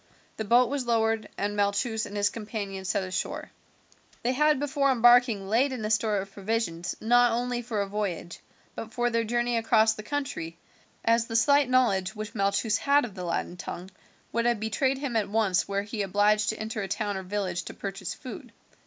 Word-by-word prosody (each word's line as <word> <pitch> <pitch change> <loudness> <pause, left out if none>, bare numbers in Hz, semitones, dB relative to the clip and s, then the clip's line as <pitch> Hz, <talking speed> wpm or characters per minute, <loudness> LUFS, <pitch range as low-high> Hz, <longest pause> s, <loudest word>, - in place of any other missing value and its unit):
The 220 - -3
boat 240 +4 +5
was 275 -3 -2
lowered, 225 -2 +1
and 205 +1 -2
Malchus 205 +2 0
and 205 - -7
his 205 0 +2
companions 200 -4 -5
set 200 - +1
on 185 - -6
shore. 185 - -3 0.7
They 245 - +2
had 300 +1 +3
before 280 -1 +1
embarking 240 -4 +5
laid 245 +7 +2
in 245 -5 -4
a 215 - -1
store 215 -1 +2
of 195 0 -4
provisions 195 -4 -2
not 245 +1 +4
only 245 +1 -1
for 225 -3 -2
a - - -4
voyage, 195 -4 -4 0.3
but 225 - -7
for 240 0 0
their 230 0 +1
journey 240 +1 0
across 220 -1 +4
the 215 - -8
country, 210 - -4 0.5
as 230 0 +3
the 225 - -5
slight 280 +3 +4
knowledge 215 -6 +2
which 215 0 -6
Malchus 205 +1 +1
had 285 -1 +3
of 220 - -9
the 185 -1 -7
Latin 175 +1 -3
tongue 180 +1 -7 0.4
would 235 0 0
have 240 -2 +2
betrayed 260 +5 0
him 270 -4 -4
at 210 -3 +1
once 205 -4 +1
were 200 0 -1
he 210 +1 -4
obliged 205 +2 +2
to 220 - -2
enter 220 0 -4
a 195 - -3
town 205 0 -2
or 190 - -3
village 185 -2 -2
to - - -8
purchase 195 -2 -5
food. 260 -4 -9
220 Hz, 200 wpm, -27 LUFS, 200-240 Hz, 0.7 s, boat